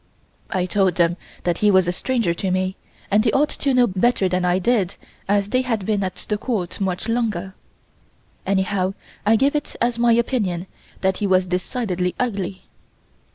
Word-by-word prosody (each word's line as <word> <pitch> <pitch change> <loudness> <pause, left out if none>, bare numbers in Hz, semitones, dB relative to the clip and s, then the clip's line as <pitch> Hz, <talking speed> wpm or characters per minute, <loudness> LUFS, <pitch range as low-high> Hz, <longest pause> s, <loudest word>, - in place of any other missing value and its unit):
I 185 -1 0
told 185 -1 +1
them 170 0 +3 0.3
that 175 -1 0
he 210 - +4
was 190 -3 +4
a - - +2
stranger 230 -1 0
to 190 +3 -3
me 185 +1 0 0.4
and 210 +2 +4
they 225 - +3
ought 295 +2 +3
to 280 - 0
know 250 -1 +5
better 195 0 +2
than 180 0 0
I 180 0 +3
did 195 -2 +1 0.3
as 200 0 +2
they 255 +2 +2
had 225 -6 -2
been 205 -1 +1
at 185 -1 -5
the 210 -1 -1
Court 205 -8 -3
much 185 +2 -1
longer. 215 -6 -1 0.9
Anyhow 190 0 0 0.3
I 220 - +6
gave 275 +5 +3
it 295 - -3
as 235 0 0
my 235 -1 +5
opinion 210 -7 0 0.4
that 190 -1 +1
he 205 - -1
was 185 -1 +3
decidedly 180 0 -2
ugly. 195 -6 -2
195 Hz, 180 wpm, -22 LUFS, 185-230 Hz, 0.9 s, I